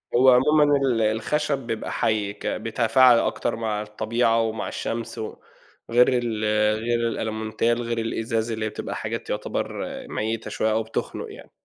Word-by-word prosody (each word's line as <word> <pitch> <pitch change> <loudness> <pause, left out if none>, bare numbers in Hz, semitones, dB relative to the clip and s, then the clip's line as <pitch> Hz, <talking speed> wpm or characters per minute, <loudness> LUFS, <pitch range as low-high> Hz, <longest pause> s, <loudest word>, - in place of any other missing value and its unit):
هو 130 +2 +6
عمومًا 150 +5 +5
ال 130 -5 +1
الخشب 115 +7 0
بيبقى 115 -4 -4
حي، 105 -2 0
ك - - -7
بيتفاعل 115 +2 +4
أكتر 120 - -1
مع 110 -2 -2
الطبيعة 115 +2 +1
ومع 110 -1 -2
الشمس، 115 0 -4
و 110 - -5 0.5
غير 120 +2 +5
ال 120 -4 -1 0.4
غير 120 0 +1
الالمونتال، 110 +1 -1
غير 115 0 -2
الإزاز 115 0 -1
اللي 110 -1 -2
هي - - -1
بتبقى - - -5
حاجات - - -4
يعتبر - - -3 0.2
ميتة 110 0 -3
شوية 110 +1 0
أو 110 +1 +1
بتخنق 110 - -4
يعني. - - -12
115 Hz, 155 wpm, -24 LUFS, 110-120 Hz, 0.5 s, هو